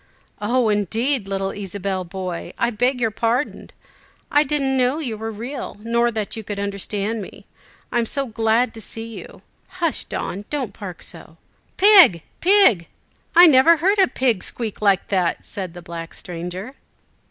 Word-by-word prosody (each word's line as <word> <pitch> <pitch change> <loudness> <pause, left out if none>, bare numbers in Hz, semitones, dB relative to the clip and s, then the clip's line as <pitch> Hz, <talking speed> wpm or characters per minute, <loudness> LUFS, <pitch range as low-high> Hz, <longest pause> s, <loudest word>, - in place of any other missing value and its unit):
"Oh, 235 +2 +1
indeed! 220 - 0
little 195 0 -2
Ysabel 195 -1 -4
boy, 185 -2 -5
I 235 - +1
beg 245 +3 0
your 225 -2 +1
pardon. 235 +6 -1 0.6
I 290 - +5
didn't 275 -2 0
know 255 +2 +2
you 260 -9 -3
were 220 +1 -5
real, 235 +5 -6
nor 235 +1 +2
that 215 -3 -3
you 220 - -6
could 205 0 -5
understand 200 +2 -3
me! 190 - -11 0.5
I 240 - +1
am 230 - 0
so 275 +3 -1
glad 225 +1 +1
to 225 - -9
see 225 +2 -7
you. - - -13 0.3
Hush, 335 -4 0
Don! 200 +3 -5
don't 280 -5 -3
bark 190 -4 -7
so!" - - -10 0.4
"Pig, 375 - +7 0.2
pig, 355 - +5 0.5
I 350 +1 +10
never 320 +2 +6
heard 390 +6 +2
a 380 - +6
pig 245 - 0
squeak 225 -4 -4
like 200 -3 +2
that," 185 -4 0
said 185 -4 -6
the 175 - -10
black 165 -1 -7
stranger. 180 +7 -6
225 Hz, 165 wpm, -21 LUFS, 195-260 Hz, 0.6 s, I